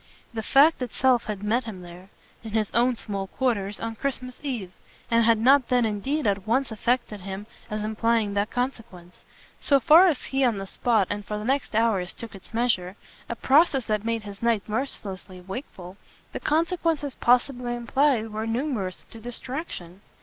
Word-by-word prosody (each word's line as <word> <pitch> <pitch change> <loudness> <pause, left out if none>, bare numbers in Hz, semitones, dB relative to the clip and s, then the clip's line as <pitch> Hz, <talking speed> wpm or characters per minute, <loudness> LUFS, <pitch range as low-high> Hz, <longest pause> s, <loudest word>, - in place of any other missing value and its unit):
The 225 - -3
fact 280 +7 +5
itself 250 0 +2
had 205 -2 -5
met 230 +4 +1
him 195 -5 -7
there 175 +2 -12 0.3
in 220 -2 -8
his 215 -2 0
own 245 +2 +3
small 200 -3 -4
quarters 205 -5 -1
on 225 0 -4
Christmas 255 0 -4
Eve, 240 -11 -4 0.4
and 230 0 +4
had 230 -1 +5
not 260 +3 +5
then 250 -2 +3
indeed 245 +9 -1
at 200 -1 0
once 255 +2 +1
affected 235 -1 -1
him 195 +2 -6 0.2
as 215 0 -3
implying 220 -1 +1
that 205 +1 0
consequence. 225 -8 -4 0.4
So 280 -2 +3
far 330 +7 +7
as 310 -7 0
he 270 0 0
on 235 -5 +2
the 195 - -4
spot 220 +1 +1
and 205 - -3
for 210 +1 -4
the 210 - -5
next 270 -2 0
hours 215 -5 +1
took 230 -1 -8
its 195 - -13
measure 220 -6 0 0.3
a 235 - -2
process 275 -1 +3
that 215 -1 -1
made 230 -1 -1
his 200 -1 -9
night 230 -3 +1
mercilessly 205 -5 -4
wakeful 190 -2 -8 0.4
the - - -3
consequences 325 -3 0
possibly 245 0 +1
implied 240 -1 +1
were 215 +1 -3
numerous 225 -6 -2
to 225 - -10
distraction. 240 - -6
230 Hz, 175 wpm, -25 LUFS, 205-255 Hz, 0.4 s, far